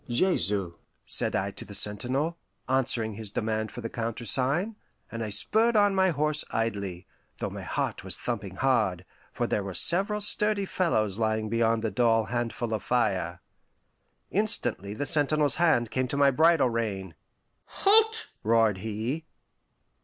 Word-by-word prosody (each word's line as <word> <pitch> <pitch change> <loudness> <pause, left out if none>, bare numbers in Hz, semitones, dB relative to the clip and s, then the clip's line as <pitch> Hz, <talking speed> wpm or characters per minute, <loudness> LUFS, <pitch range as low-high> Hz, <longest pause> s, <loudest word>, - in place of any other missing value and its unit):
"Jesu," 105 - +1 0.3
said - - +3
I 100 +1 -1
to - - -8
the 100 - -6
sentinel, 130 +12 0 0.3
answering 125 -4 +1
his 110 0 -6
demand 110 +1 -2
for 120 - -8
the 115 - -5
countersign, 130 - -2 0.4
and 115 -1 -4
I 110 - -4
spurred 220 - +2
on 205 -1 +4
my 190 -1 +3
horse 150 -1 +1
idly, 100 -6 -3 0.3
though - - -4
my - - -7
heart - - -3
was - - -3
thumping - - -5
hard, - - 0 0.3
for - - -2
there 105 - -1
were 95 -2 -6
several 195 - +3
sturdy 210 0 +2
fellows 110 - 0
lying 110 -1 -1
beyond 115 0 +1
the 110 - -1
dull 115 +1 +2
handful 120 -1 -2
of 110 - -2
fire. 95 -7 -1 0.9
Instantly 120 - 0
the 145 - -3
sentinel's 145 0 +2
hand 120 -10 +2
came 130 0 -1
to 140 - -4
my 140 -1 +4
bridle 155 -2 +3
rein. 100 -6 -3 0.5
"Halt!" 445 +2 +3 0.2
roared 110 -3 +2
he. 110 +9 -4
120 Hz, 150 wpm, -27 LUFS, 110-155 Hz, 0.9 s, on